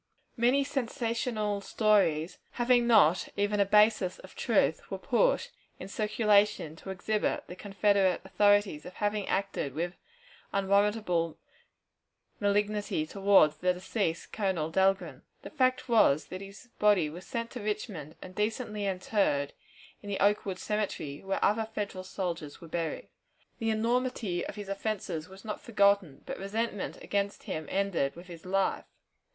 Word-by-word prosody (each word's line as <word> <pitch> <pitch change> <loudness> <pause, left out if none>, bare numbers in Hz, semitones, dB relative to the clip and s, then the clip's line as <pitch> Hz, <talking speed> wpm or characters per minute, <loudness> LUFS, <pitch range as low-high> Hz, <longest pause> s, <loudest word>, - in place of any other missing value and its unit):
Many 250 +4 +3
sensational 230 -5 -2
stories, 190 -7 +2
having 240 -1 +3
not 185 -7 +5
even 205 +1 +1
a 200 - +5
basis 210 -3 +4
of - - -13
truth, - - +1
were - - -3
put - - +1 0.3
in - - -8
circulation 210 -5 +2
to 190 - -10
exhibit 205 +3 -1
the 180 - -9
Confederate 195 -1 +2
authorities 205 -6 +3
as 180 - -9
having 205 0 -1
acted 195 -8 -2
with 175 +2 -2 0.6
unwarrantable 200 -4 +1 1.0
malignity 205 -4 0
toward 195 -3 +4
the 180 0 +3
deceased 180 -2 -2
Colonel 185 -7 -1
Dahlgren. 190 +2 +1 0.2
The - - -8
fact 255 -4 +1
was, 210 - +4
that 185 +1 -6
his 200 +5 -11
body 205 -6 +4
was 175 +4 -9
sent 230 0 -4
to 250 - -6
Richmond 205 - -4
and 185 - -10
decently 210 0 -2
interred 185 -7 0 0.5
in 205 - -9
the 200 - -2
Oakwood 200 -2 +2
Cemetery, 200 -9 -3
where 195 0 0
other 215 +2 +2
Federal 200 -3 -3
soldiers 170 -6 -4
were 170 - -11
buried. 165 -1 -3 0.5
The 225 - 0
enormity 225 -4 0
of - - -7
his 205 -2 -7
offenses 195 -5 -3
was 195 +3 -13
not 210 - -5
forgotten, 200 - +2
but - - -6
resentment 205 +1 -3
against 200 0 -2
him 155 -1 -5
ended 190 -8 0
with 175 +2 -11
his 170 -1 -11
life. 195 +1 0
200 Hz, 140 wpm, -30 LUFS, 180-215 Hz, 1.0 s, not